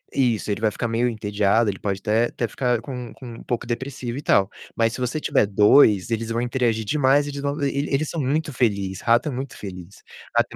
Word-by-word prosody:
isso, 120 -5 +1
ele 100 - -3
vai 110 - +3
ficar 115 - -3
meio 115 +2 +1
entediado, 105 0 +1
ele 95 - -10
pode 100 -2 -2
até 110 +3 +2
até 120 0 -3
ficar 125 -2 0
com 125 -4 -6
com 130 - -12
um - - -11
pouco 120 -1 -3
depressivo 125 0 -4
e - - -6
tal, 100 -8 +3 0.3
mas 115 0 +1
se 125 - -6
você 125 +5 -1 0.3
2, 105 0 +5
eles 115 0 -1
vão 115 +1 -1
interagir 120 -3 0
demais, 145 +2 +3
eles 140 -1 -5
vão 140 +2 -2
e 140 +1 0
eles 145 +2 +1
são 165 - -2
muito 150 +2 -1
feliz, 100 -6 -1
rato 120 +4 +3
é - - -3
muito 130 +2 -6
feliz, 90 -1 -9 0.3
rato - - +4
120 Hz, 215 wpm, -23 LUFS, 105-135 Hz, 0.3 s, 2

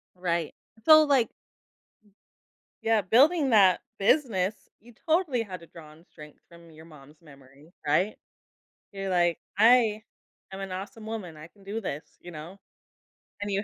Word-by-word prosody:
Right. 170 -3 -2 0.3
So, 310 -1 +8
like 275 -6 +2 1.5
Yeah, 225 -1 +2
building 275 - +3
that 195 -5 +5 0.2
business, 200 -4 0
you 240 +2 -18
totally 315 -7 +1
had 185 -5 -9
to 170 - -14
draw 160 -2 -14
on 155 +2 -19
strength 150 -4 -15
from 170 -1 -17
your 160 +1 -15
mom's 150 0 -17
memory, 140 +1 -19
right? 180 +8 +1 0.8
You're 195 -1 -5
like, 175 -2 +2 0.2
"I 220 0 +4 0.5
am 195 - -7
an 195 -1 -6
awesome 205 +4 -8
woman, 205 -8 -6
I 155 +1 -11
can 200 +1 -23
do 205 +3 -4
this," 155 -7 -7
you 175 - -11
know? 170 +4 -10 0.8
And 205 - -3
you 200 +1 -1
190 Hz, 150 wpm, -27 LUFS, 165-225 Hz, 1.5 s, So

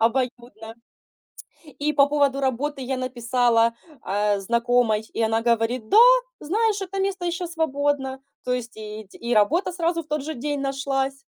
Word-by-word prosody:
обоюдно. 235 -1 -2 1.1
И 300 +1 +1
по 280 -1 +5
поводу 285 -2 +1
работы 270 +1 -1
я 260 +1 -2
написала, 240 -2 +1 0.3
а, 205 +1 0
знакомой, 235 +1 +2
и - - 0
она 225 0 +1
говорит: 230 0 0
"Да, - - +5 0.4
знаешь, 415 +5 0
это 390 +1 -4
место 385 -2 -2
ещё 350 +1 -2
свободно". 285 -4 -1 0.3
То 250 - -1
есть 245 -1 -4
и 215 0 -8
те - - -15
и 235 +1 -1
работа 315 - +2
сразу 335 -1 -1
в - - -24
тот 300 -1 -1
же 315 +2 -5
день 285 +3 -3
нашлась. 275 0 -1
265 Hz, 160 wpm, -24 LUFS, 235-295 Hz, 1.1 s, по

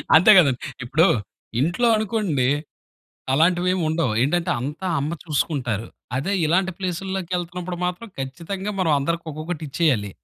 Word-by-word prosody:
అంతే 180 +7 +8
కదండి. 140 -8 +5 0.2
ఇప్పుడు 155 +9 +3 0.5
ఇంట్లో 175 - +2
అనుకోండి, 200 - 0 0.9
అలాంటివి 175 +5 +3
ఏమి 185 - -1
ఉండవు 155 -7 0
ఏంటంటే 170 +6 +1
అంతా 150 +8 -4
అమ్మ 150 +4 -2
చూసుకుంటారు. 135 - -1 0.3
అదే 160 +10 -1
ఇలాంటి 190 +4 +2
ప్లేసుల్లోకెళ్తున్నపుడు 180 -1 -3
మాత్రం 180 +6 -4
ఖచ్చితంగా 170 +9 -4
మనం 165 -4 +2
అందరికి 170 +4 -2
ఒక్కొక్కటి 155 +2 -5
ఇచ్చేయాలి. 130 - +1
170 Hz, 125 wpm, -23 LUFS, 145-185 Hz, 0.9 s, అంతే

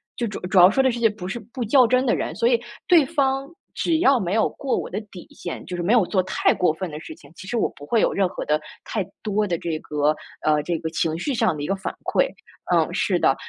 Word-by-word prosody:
就 235 - -2
主 210 - -6
主 190 0 0
要 180 +1 +9
说 265 +6 +2
的 260 - +3
是 235 - -4
些， 225 -1 +4
不 200 -4 -7
是 215 +5 -4
不 235 +4 -6
较 245 +2 +5
真 255 +2 +2
的 240 - +2
人， - - -3
所 230 - +2
以 240 -2 +3 0.3
对 335 -5 +6
方 270 -2 0 0.3
只 325 -2 0
要 275 -6 +4
没 185 -2 -2
有 220 - +3
过 275 - -2
我 - - -4
的 200 - -3
底 180 - -11
线， 175 - -7
就 180 - -5
是 175 - -3
没 195 - +1
有 230 -6 +5
做 185 0 +1
太 190 - +2
过 175 -4 +2
分 185 +2 -5
的 150 - -6
事 - - -9
情， 140 - -18
其 190 - -11
实 240 - -2
我 - - +1
不 145 - -11
会 225 +8 +2
有 - - +2
任 195 -2 +2
何 - - -5
的 150 0 +1 0.3
太 210 - -2 0.2
多 210 0 0
的 170 -2 -1
这 165 -2 -3
个， 150 0 0 0.3
呃， 150 -1 +3
这 170 +1 -1
个 160 0 -3
情 160 0 -1
绪 275 +9 -2
上 185 -8 +1
的 145 - -6
一 - - -3
个 195 - 0
反 190 - -5
馈。 - - +2 0.5
嗯， - - +2
是 - - +1
的。 - - +3
205 Hz, 300 characters per minute, -23 LUFS, 175-245 Hz, 0.5 s, 要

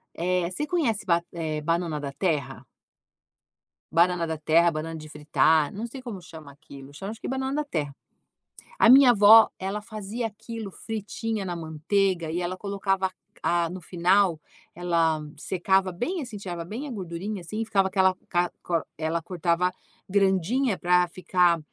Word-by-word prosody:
eh, 180 0 0
você 295 +11 -3
conhece 280 - 0
ba 170 -1 +2
eh, 155 -3 -3
banana 165 0 -1
da 140 -1 -5
terra? 140 -5 -2 1.3
banana 170 0 +3
da 160 0 -3
terra, 160 +3 +4
banana 165 +1 -4
de 155 -1 -9
fritar, 150 0 +2
não 220 +4 -4
sei 265 +3 -9
como 230 -7 -7
chama 160 -4 -12
aquilo, 140 -1 -13
chama 195 +7 -6
acho 225 - -10
que - - -5
banana 265 +1 -2
da 300 - 0
terra. 145 - -3 0.8
A - - +6
minha 265 0 +9
avó 220 +1 +8
ela 195 +2 -3
fazia 215 +1 -5
aquilo 225 0 -7
fritinha 220 +1 -4
na 175 -2 -4
manteiga 170 +2 0
e 175 +2 -2
ela 180 +1 -3
colocava 195 -1 -1
c 185 - -22 0.3
a 170 -1 +1
no 185 +1 -7
final, 180 +1 +2 0.4
ela 170 -2 +1
m 150 -1 -10
secava 190 +1 +1
bem, 285 - -3
assim, 245 -7 -7
tirava 175 -4 -5
bem 235 - -5
a - - -6
gordurinha, 190 -1 -5
assim 195 +6 -4
e - - -1
ficava 195 -3 +2
aquela, 190 -1 +3
ca 175 -1 +1
co 165 -3 -1
ela 160 +1 -1
cortava 175 +1 0 0.4
grandinha 195 +4 +2
pra 180 0 +3
ficar, 180 -1 +2
180 Hz, 170 wpm, -26 LUFS, 165-205 Hz, 1.3 s, minha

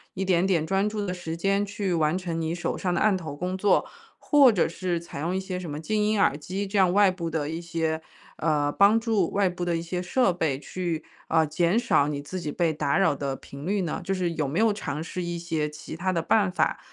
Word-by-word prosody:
一 190 - -2
点 180 -1 +3
点 170 -5 +2
专 195 +4 +1
注 210 -1 -3
的 180 - -2
时 165 -2 -5
间 195 +3 +1
去 200 -2 -2
完 160 0 +2
成 175 -3 -3
你 160 +1 -1
手 175 - -2
上 180 - -1
的 175 - 0
案 215 -2 +3
头 160 -6 -5
工 180 +5 -3
作， 195 +2 +3 0.3
或 285 -4 +5
者 195 -6 +2
是 175 +1 -2
采 170 -4 -9
用 170 +5 -1
一 - - 0
些 190 -1 -4
什 175 -3 -6
么 145 0 -4
静 210 +6 0
音 210 0 +1
耳 140 - +3
机 185 +7 -4
这 200 +1 0
样 185 -2 +5
外 200 0 +5
部 170 -2 -4
的 155 -3 -2
一 160 +2 -4
些， 165 -2 -2 0.4
呃， 150 -2 +1
帮 200 +7 +5
助， 220 -6 +1
外 200 -1 +2
部 180 0 -4
的 175 -1 0
一 - - -3
些 180 +1 -3
设 185 +2 +2
备 160 -6 0
去， 170 -1 -4 0.2
呃， 160 -1 +3
减 170 +6 +1
少 235 - +3
你 145 -1 -3
自 185 +6 -5
己 155 -4 -4
被 165 0 +1
打 145 -2 0
扰 195 -7 +3
的 140 -1 -3
频 140 +2 -10
率 200 +1 +1
呢？ 170 -4 -3
就 195 - -1
是 180 -2 -1
有 155 -3 -1
没 145 +6 -1
有 220 -1 +4
尝 150 -7 -4
试 180 +2 -5
一 175 0 -3
些 160 -3 -2
其 150 +1 -9
它 185 +3 -1
的 170 -2 0
办 200 +4 +3
法 - - 0
175 Hz, 275 characters per minute, -26 LUFS, 160-195 Hz, 0.4 s, 或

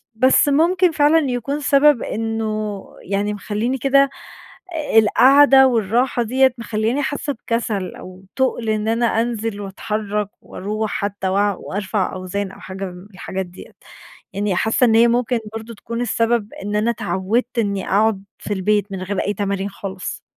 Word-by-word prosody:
بس 260 +5 +4
ممكن 350 +5 +3
فعلًا 300 +1 +4
يكون 260 +4 -2
سبَب 285 -1 +4
إنّه، 215 -2 -3 0.2
يعني 200 +2 -1
مخلّيني 215 +5 -2
كده 275 +2 +3 0.9
القاعدة 265 +5 +6
والراحة 240 +2 +1
دِيَّة 260 +3 +3
مخلّياني 230 +3 -1
حاسّة 285 +1 -2
بكسل 225 -5 -3
أو 185 +1 -11
تُقل 255 -4 0
إن 215 0 0
أنا 230 0 +1
أنزِل 225 -3 -3
وأتحرّك 210 +1 -3
وأرُوح 215 +2 -4
حتى 200 -2 -3
وأ 200 +2 +2
وأرفع 195 +1 -3
أوزان 190 +1 -4
أو - - -14
حاجة 190 +1 -6
من 180 +1 -10
الحاجات 190 0 -4
دِيَّة، 175 +1 -13 0.6
يعني 200 -1 -1
حاسّة 220 +6 +2
إن 225 -2 +3
هي 230 +1 +6
ممكن 245 0 +1 0.2
برضه 225 +1 -7
تكون 230 +3 -5
السبب 230 -2 0
إن 205 +1 -3
أنا 210 +2 +1
اتعوِّدت 220 +4 -1
إني 200 -3 -1
أقعد 205 0 +2 0.2
في 210 - -4
البيت 205 +1 0
من 185 - -4
غير 195 +1 -3
أي 205 - -1
تمارين 200 -1 -2
خالص. 190 -1 -6
215 Hz, 150 wpm, -20 LUFS, 200-240 Hz, 0.9 s, القاعدة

